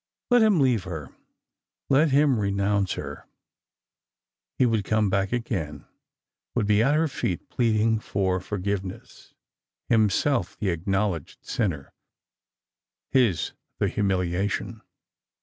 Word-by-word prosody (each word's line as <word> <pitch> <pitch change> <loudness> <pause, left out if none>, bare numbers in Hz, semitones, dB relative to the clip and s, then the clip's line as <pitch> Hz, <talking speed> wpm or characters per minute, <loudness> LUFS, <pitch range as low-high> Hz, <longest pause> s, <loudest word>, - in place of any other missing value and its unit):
Let 245 -1 +6
him 215 -6 +4
leave 125 -8 +2
her; 80 -6 -7 0.7
let 150 +4 +4
him 140 -3 +3
renounce 100 -1 +1
her. - - -7 1.3
He 130 - +4
would 115 -4 +1
come 105 -1 +1
back 95 0 +1
again, 100 -11 -3 0.7
would - - +1
be 105 +1 +3
at 135 +6 +3
her 160 +1 +2
feet 100 - -3
pleading 110 -2 +2
for 95 -3 -1
for 100 +3 -5
giveness, 95 -1 -5 0.5
himself 115 +4 +2
the 100 - -1
acknowledged 90 -1 -2
sinner, 85 - -2 1.2
his 120 -10 +2 0.2
the - - +1
humiliation. 95 -1 -1
105 Hz, 115 wpm, -25 LUFS, 95-120 Hz, 1.3 s, Let